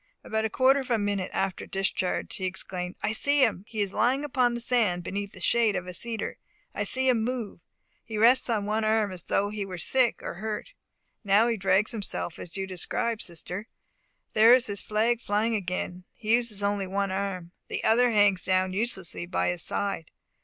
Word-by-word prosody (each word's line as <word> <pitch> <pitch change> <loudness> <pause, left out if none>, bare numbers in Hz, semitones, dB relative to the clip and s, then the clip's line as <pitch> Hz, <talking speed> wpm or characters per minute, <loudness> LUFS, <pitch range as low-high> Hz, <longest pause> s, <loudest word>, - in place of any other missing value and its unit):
About 220 0 -1
a - - 0
quarter 265 +4 +4
of 265 - -6
a 235 - +3
minute 205 -3 -1
after 195 -1 -2
the - - -19
discharge 190 -1 -1
he 185 - -3
exclaimed, 180 -1 -4
"I - - +1
see 285 +5 +3
him! 205 -5 +1
He 220 -2 -3
is 200 -1 -1
lying 265 +4 +1
upon 250 -4 +1
the - - -2
sand 225 -8 +1
beneath 200 +2 -4
the - - -11
shade 220 +3 +3
of 180 -1 -3
a 180 - -7
cedar. 225 +5 -2 0.3
I - - -2
see 260 0 +2
him 240 -4 +3
move. 240 -5 -3 0.4
He 220 - -6
rests 240 +4 +5
on 215 -3 0
one 215 +1 0
arm, 215 -2 +2
as 185 -2 -6
though 200 +4 0
he 210 -1 -3
were 185 -2 -6
sick 250 +7 +1
or - - -4
hurt. 215 - -5 0.5
Now 205 +3 +4
he 230 - +1
drags 195 +1 +2
himself 200 -6 -4
as 175 +2 -9
you 195 - -2
describe, 210 +5 -1
sister. 180 +5 -5 0.7
There 225 +3 +8
is 255 - +1
his 205 -1 -1
flag 225 +2 0
flying 215 +3 0
again. 180 -2 -3
He 220 -1 -1
uses 230 -4 +2
only 200 -1 0
one 195 +1 -1
arm. 190 -3 -3 0.2
The - - -4
other 245 +3 +4
hangs 205 -4 +3
down 185 0 +1
uselessly 190 -5 -2
by 180 - 0
his 175 -1 -2
side. 195 -4 -2
205 Hz, 205 wpm, -27 LUFS, 190-230 Hz, 0.7 s, There